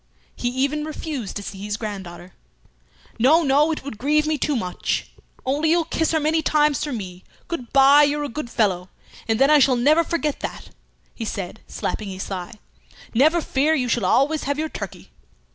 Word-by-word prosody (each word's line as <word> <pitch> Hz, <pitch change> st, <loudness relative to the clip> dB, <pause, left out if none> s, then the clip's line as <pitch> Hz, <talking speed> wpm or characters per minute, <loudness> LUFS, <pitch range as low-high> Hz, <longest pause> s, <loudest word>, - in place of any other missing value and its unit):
He 245 Hz, -, -3 dB
even 275 Hz, +4 st, -1 dB
refused 300 Hz, -, -5 dB
to 205 Hz, -, -4 dB
see 195 Hz, -1 st, -8 dB
his 205 Hz, +1 st, -3 dB
granddaughter. 190 Hz, -5 st, -7 dB, 0.9 s
"No, 305 Hz, +8 st, +5 dB
no! 290 Hz, +2 st, +3 dB
It 310 Hz, -, -4 dB
would 240 Hz, -6 st, -8 dB
grieve 300 Hz, +3 st, +2 dB
me 310 Hz, 0 st, +1 dB
too 295 Hz, -, 0 dB
much. 180 Hz, -7 st, -2 dB, 0.3 s
Only 290 Hz, +4 st, +1 dB
you'll 335 Hz, 0 st, +3 dB
kiss 320 Hz, -1 st, 0 dB
her 320 Hz, -, +2 dB
many 310 Hz, +2 st, +1 dB
times 300 Hz, -2 st, +2 dB
for 295 Hz, -, -3 dB
me. 185 Hz, -6 st, -6 dB, 0.2 s
Good 255 Hz, -9 st, -5 dB
bye! 275 Hz, +2 st, +7 dB
you're 295 Hz, 0 st, +2 dB
a -, -, -2 dB
good 285 Hz, 0 st, -6 dB
fellow! 185 Hz, -6 st, 0 dB, 0.4 s
And 225 Hz, -1 st, +1 dB
then 275 Hz, +4 st, +4 dB
I 300 Hz, -, +7 dB
shall 265 Hz, -2 st, +4 dB
never 300 Hz, +7 st, +4 dB
forget 305 Hz, -3 st, -2 dB
that," -, -, -7 dB, 0.4 s
he 230 Hz, -, -6 dB
said, 200 Hz, -1 st, -5 dB
slapping 210 Hz, -2 st, -4 dB
his 190 Hz, 0 st, -5 dB
thigh. 185 Hz, +1 st, -6 dB, 0.6 s
"Never 310 Hz, +8 st, +4 dB
fear, 300 Hz, +2 st, +1 dB
you 255 Hz, -4 st, 0 dB
shall 235 Hz, -4 st, 0 dB
always 285 Hz, +10 st, +2 dB
have 285 Hz, +1 st, -1 dB
your 315 Hz, +1 st, -2 dB
turkey." -, -, -8 dB
275 Hz, 190 wpm, -22 LUFS, 220-305 Hz, 0.9 s, bye